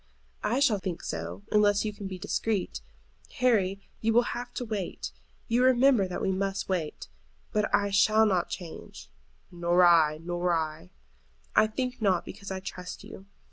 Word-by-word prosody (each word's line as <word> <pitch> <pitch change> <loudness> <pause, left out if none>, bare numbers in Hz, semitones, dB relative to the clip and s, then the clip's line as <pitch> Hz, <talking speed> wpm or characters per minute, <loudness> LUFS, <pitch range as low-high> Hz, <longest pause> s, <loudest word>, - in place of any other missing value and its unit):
"I 235 +5 +1
shall 235 -8 +3
think 180 -2 -5
so, 85 +4 -5
unless 205 0 +3
you 210 - -2
can 205 -1 -7
be 190 -1 -6
discreet. 205 +1 -2 0.5
Harry, 210 -8 +2 0.2
you 225 0 +1
will 240 +1 +3
have 245 0 -6
to 245 - -3
wait. 210 -5 -4 0.4
You 235 +1 +2
will 255 - +6
remember 255 -5 +4
that 180 - -4
we 190 - +1
must 195 +1 -2
wait; 175 -5 -3 0.5
but 210 -1 +1
I 200 0 +2
shall 215 +2 +5
not 185 -4 +1
change." 170 -4 -8 0.4
"Nor 175 0 +3
I, 160 -3 +5
nor 175 +1 -1
I." 155 - -3 0.7
"I 215 - +6
think 250 +2 -4
not, 190 -5 +2
because 200 0 -9
I 190 -1 -3
trust 185 -1 -7
you. 195 - -11
195 Hz, 170 wpm, -28 LUFS, 175-220 Hz, 0.7 s, will